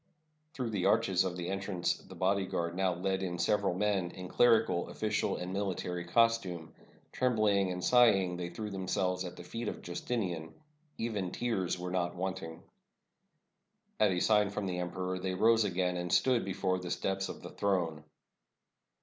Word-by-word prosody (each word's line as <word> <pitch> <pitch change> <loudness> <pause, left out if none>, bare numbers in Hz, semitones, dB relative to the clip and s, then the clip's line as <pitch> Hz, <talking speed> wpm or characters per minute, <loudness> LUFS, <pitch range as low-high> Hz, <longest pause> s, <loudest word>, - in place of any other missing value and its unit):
Through 125 -4 -2
the 100 -4 +1
arches 95 -1 +3
of 90 -1 -3
the 85 -1 -4
entrance 95 -2 -1
the - - -13
bodyguard 95 -3 0
now 95 -1 +1
led 95 +2 -1
in 90 -2 -3
several 95 +2 +1
men, 100 -3 +1
in 90 0 -8
clerical, 115 -7 +3
oflBcial, - - -1
and 90 +1 -4
military 90 -3 -2
costume. 95 -5 +1 0.4
Trembling 105 -6 +2
and 90 0 -4
sighing, 100 -8 +5
they 90 0 -4
threw 105 +4 -6
themselves 95 -1 -1
at 90 0 -7
the 90 - -9
feet 115 +6 -5
of - - -5
Justinian. 90 -3 -3 0.4
Even 105 -5 -2
tears 95 -5 -1
were 90 0 -5
not 90 -1 -1
wanting. 90 -3 -4 1.4
At 105 - +5
a 90 -1 0
sign 105 +1 +4
from 100 0 -3
the 90 -1 -2
emperor 90 +1 -3
they 95 0 -2
rose 115 +2 +4
again, 90 -1 0
and 90 0 -3
stood 125 -3 +3
before 95 -1 -1
the 90 -1 -6
steps 95 +2 -1
of - - -8
the - - -8
throne. 85 -6 -1
95 Hz, 165 wpm, -32 LUFS, 90-105 Hz, 1.4 s, sighing